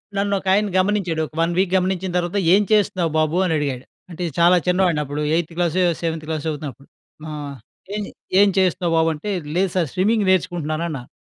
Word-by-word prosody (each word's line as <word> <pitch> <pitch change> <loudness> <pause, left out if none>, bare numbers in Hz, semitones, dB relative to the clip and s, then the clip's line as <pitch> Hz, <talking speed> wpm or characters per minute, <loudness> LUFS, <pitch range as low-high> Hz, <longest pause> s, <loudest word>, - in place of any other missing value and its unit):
నన్ను 200 0 0
ఒకాయన 195 +2 +2
గమనించాడు. 185 -4 0
ఒక - - -25
1 170 +1 +1
వీక్ 190 -1 +2
గమనించిన 185 0 -1
తర్వాత 175 +2 -1 0.2
"ఏం 200 - +5
చేస్తున్నావు 185 -5 +2
బాబు?" 155 +2 +1
అని 170 - 0
అడిగాడు. 135 -4 -3 0.2
అంటే 180 0 -6 0.2
చాలా 175 +2 +6
చిన్నవాడినప్పుడు. 155 -6 +1
ఎయిథ్ 170 0 -1
క్లాసో 175 +1 +1 0.2
సెవెంత్ 165 -2 -2
క్లాస్ 155 -2 -3
చదువుతున్నప్పుడు. 145 -3 -6 0.4
ఆహ్, 145 -2 -6 0.4
"ఏం 210 - -2 0.4
ఏం 205 - +5
చేస్తున్నావు 180 -2 +1
బాబు?" 160 0 +3
అంటే, 155 +7 -6 0.3
లేదు 190 +1 +2
సార్ 175 -4 +1
స్విమ్మింగ్ 205 +3 +2
నేర్చుకుంటున్నానన్నాను. 160 -6 -1
175 Hz, 165 wpm, -21 LUFS, 155-190 Hz, 0.4 s, చాలా